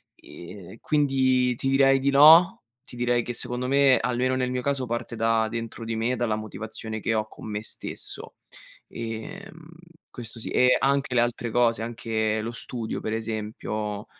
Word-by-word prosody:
e 90 +4 -12
quindi 130 -4 +2
ti 135 - -2
direi 135 0 +4
di 135 +1 +1
no, 160 +6 +7 0.2
ti - - -13
direi 120 0 +1
che, 120 - -5
secondo 125 +2 -2
me, 140 0 +5
almeno 125 +1 0
nel 125 -1 -1
mio 125 0 -2
caso, 140 0 -1
parte 120 0 -4
da 115 0 +1
dentro 115 0 -6
di 115 0 -3
me, 115 +3 0
dalla 115 -3 0
motivazione 110 +1 -6
che 115 - 0
ho 110 -1 0
con 110 - -11
me 105 0 -4
stesso. - - -5 0.5
Ehm, 115 +8 -8 0.5
questo 115 -2 -8
sì - - -5
e 125 0 +4
anche 140 -1 +1
le - - +4
altre 120 -1 -2
cose, 115 -1 +2
anche 110 -2 -2
lo 115 +2 -4
studio, 120 -1 -4
per 110 - -4
esempio, 110 -1 -4
120 Hz, 170 wpm, -25 LUFS, 110-130 Hz, 0.5 s, no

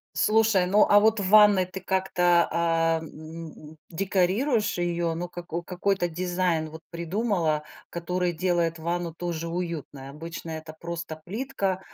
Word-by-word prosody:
Слушай, 215 -4 +3
ну, 205 +3 +5
а 205 - +6
вот 220 0 +3
в 185 - -1
ванной 210 -3 +7
ты 185 +1 -8
как-то, 180 -2 +2
а, 165 -1 +1
м, 160 -1 -10
декорируешь 200 - +1
её, 170 -1 -1
ну, 175 +2 -3
како 175 -1 -5
какой-то 185 +1 0
дизайн, 175 -2 -1
вот, 160 +1 -11
придумала, 170 -3 0 0.3
который 175 0 -2
делает 170 -1 0
ванну 170 0 -2
тоже 170 -1 -4
уютной? 165 -6 -5
Обычно 165 +2 -7
это 160 0 -7
просто 170 -1 -5
плитка, 200 -3 -2
175 Hz, 135 wpm, -26 LUFS, 165-190 Hz, 0.3 s, ванной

